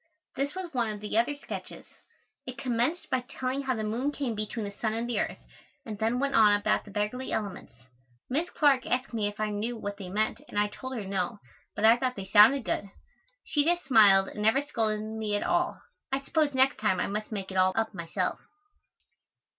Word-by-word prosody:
This 280 +4 -2
was 365 -3 -6
one 240 -3 0
of 210 -1 -5
the 210 +1 -5
other 235 +6 +2
sketches: 285 - -8 0.6
It 250 -1 -6
commenced 250 +8 -1
by 260 - +2
telling 260 +1 -3
how 260 -2 -1
the 220 - -3
moon 235 +7 -1
came 275 -5 -3
between 215 +1 -3
the 200 - -5
sun 215 +2 -2
and 230 +1 -2
the 240 - -1
earth, - - -2 0.5
and 215 -3 -6
then 225 +3 +1
went 280 +1 0
on 210 -2 +6
about - - +1
the - - -12
beggarly 210 +6 -3
elements. 185 - -5 0.4
Miss 315 +7 -1
Clark 275 -4 +3
asked 255 0 -1
me 215 -3 0
if 205 +1 -7
I 215 0 0
knew 225 +4 -3
what 205 -2 -5
they 190 -3 -7
meant 215 +3 -1
and - - -8
I 210 0 +2
told 260 +5 -7
her 215 -4 -4
no, 190 +1 -2 0.4
but 210 - +1
I 225 +2 +7
thought 255 0 -1
they 195 - -6
sounded 220 +7 +6
good. 200 - -2 0.5
She 290 - +1
just 345 +3 +1
smiled 205 -7 +6
and 210 - -7
never 225 +7 +3
scolded 220 -7 -1
me 220 -1 -3
at 205 - -1
all. - - 0 0.3
I 270 - +1
suppose 290 0 0
next 265 +1 +3
time 210 -4 +1
I - - +1
must 210 +2 -4
make 195 -3 -4
it - - -7
all 185 0 +4
up 225 0 0
myself. 170 -3 -2
225 Hz, 215 wpm, -28 LUFS, 210-260 Hz, 0.6 s, I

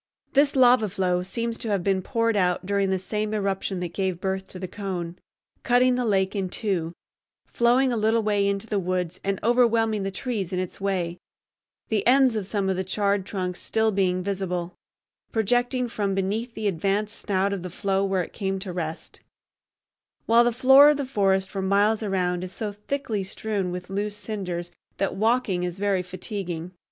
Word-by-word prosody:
This 280 +1 +4
lava 245 -4 +5
flow 180 -2 0
seems 230 +5 -3
to 225 - -4
have 200 -4 0
been 195 0 +1
poured 230 +3 0
out 180 -2 +1
during 200 0 +1
the 190 - +1
same 210 +3 -3
eruption 195 -2 -2
that 175 -1 -4
gave 185 -2 -1
birth 190 0 -2
to - - -10
the 185 0 -5
cone, 180 -3 -5 0.4
cutting 250 +1 +4
the 250 0 0
lake 195 -2 +1
in 190 -2 -1
two, 180 -5 -2 0.5
flowing 245 +2 +2
a - - 0
little 220 +1 +2
way 205 -1 +2
into 200 +1 -1
the 210 -3 -1
woods 180 -2 -2
and 195 -1 -1
overwhelming 230 -2 +3
the 195 - -2
trees 200 -3 -3
in 185 - -2
its 185 +1 -4
way, 180 -3 -1 0.7
the 215 -2 0
ends 260 -1 +5
of 205 -3 -2
some 200 -2 -1
of 190 -1 0
the 190 - -1
charred 200 0 0
trunks 180 -3 -3
still 220 0 +1
being 185 -2 +1
visible, 180 -3 -3 0.6
projecting 245 +3 +1
from 205 -4 -2
beneath 215 +5 -2
the 215 - -2
advanced 200 +4 0
snout 200 0 0
of 195 - -3
the 180 - -6
flow 195 +2 0
where 190 -2 +1
it - - -11
came 195 -2 -2
to 190 -1 -5
rest; 165 -2 -5 1.1
while 230 +1 +6
the 240 - +2
floor 265 +4 +7
of 300 - +3
the 285 - -2
forest 195 -6 +1
for 195 0 -4
miles 205 +3 +2
around 180 -4 -1
is 185 - -6
so 210 +2 -4
thickly 210 0 -3
strewn 195 0 -3
with 180 0 -5
loose 205 +1 -2
cinders 180 -5 -4 0.3
that 195 - -1
walking 220 -3 +1
is 180 0 -3
very 195 -2 +1
fatiguing. 180 -2 -5
200 Hz, 185 wpm, -25 LUFS, 185-220 Hz, 1.1 s, floor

